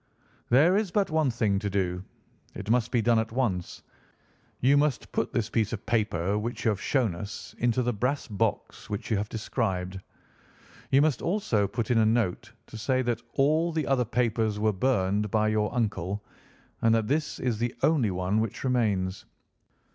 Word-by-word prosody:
"There 150 +10 +5
is 210 -2 0
but 195 -1 0
one 155 -3 +2
thing 110 -5 +1
to 100 - -2
do. 90 -2 -1 0.5
It 100 +2 -3
must 120 -1 +2
be 120 -3 +1
done 115 -1 +4
at 110 0 -2
once. 110 -8 -2 0.8
You 135 +3 +4
must 145 -3 +1
put - - -1
this 115 -4 0
piece 115 -2 0
of 105 - -5
paper 105 -3 0
which 120 +4 -4
you - - +5
have 105 -3 -1
shown 125 -9 +1
us 100 +6 -7
into 120 +1 +2
the 120 0 0
brass 125 +7 -1
box 105 +1 -2
which 105 +2 -4
you 110 - +3
have 105 +1 -3
described. 95 -5 -2 0.9
You 135 +1 +5
must 150 -5 +1
also 165 - +1
put 115 +3 -3
in 115 - +4
a 110 - +4
note 115 0 0
to 110 - -10
say 130 +3 +1
that 120 -2 -1
all 155 +5 +2
the 160 -3 -1
other 135 -2 +2
papers 110 -2 0
were 110 0 +1
burned 105 -2 +1
by 110 +1 +2
your 110 -1 0
uncle, 105 -4 -2 0.6
and 115 0 +4
that 110 -2 0
this 150 +3 -1
is 120 -4 -1
the 120 +1 -1
only 145 -9 +3
one 95 +3 0
which 110 -2 -3
remains. 105 -7 0
115 Hz, 185 wpm, -27 LUFS, 105-125 Hz, 0.9 s, There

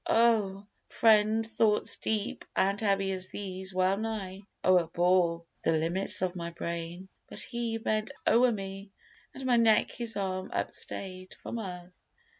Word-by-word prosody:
Oh! 215 -4 +3 0.2
friend, 220 0 +4
thoughts 220 -1 +2
deep 215 -2 -2
and 200 +2 +1
heavy 195 -2 +1
as 185 0 -2
these 190 -1 -5
well 185 +1 +2
nigh 205 -3 -4 0.2
O'erbore 175 -1 +3 0.2
the 165 - +3
limits 170 +4 +1
of 185 0 -1
my 170 -1 -4
brain; 170 +2 -5 0.2
but - - -8
he 235 -2 -2
Bent 215 -1 -1 0.2
o'er 245 +1 +5
me, 195 -1 -6 0.5
and 265 - -7
my 245 -2 +4
neck 225 -2 +4
his 230 -2 -2
arm 185 -1 -2
upstay'd 185 -1 -4
From 235 - -4
earth. 180 -3 -8
195 Hz, 140 wpm, -29 LUFS, 185-220 Hz, 0.5 s, o'er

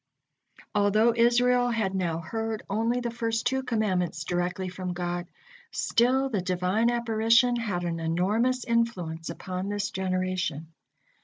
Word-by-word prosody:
'" - - -56 0.3
Although 215 +3 +3
Israel 245 +1 +4
had 220 -5 0
now 175 -4 -1
heard 225 +5 -3
only 225 +5 0
the 240 -1 -2
first 230 -1 -2
two 265 +2 +1
commandments 190 -10 -1
directly 180 +2 -2
from 180 0 -4
God, 175 0 -3 0.4
still 260 +3 +2
the 215 -8 -1
Divine 185 +5 +1
apparition 235 +1 +3
had 205 -7 -2
and 165 -1 -2
enormous 210 +10 +1
influence 180 -9 -1
upon 185 +3 -4
this 205 0 -2
generation. 185 -4 -2
205 Hz, 135 wpm, -27 LUFS, 180-235 Hz, 0.4 s, Israel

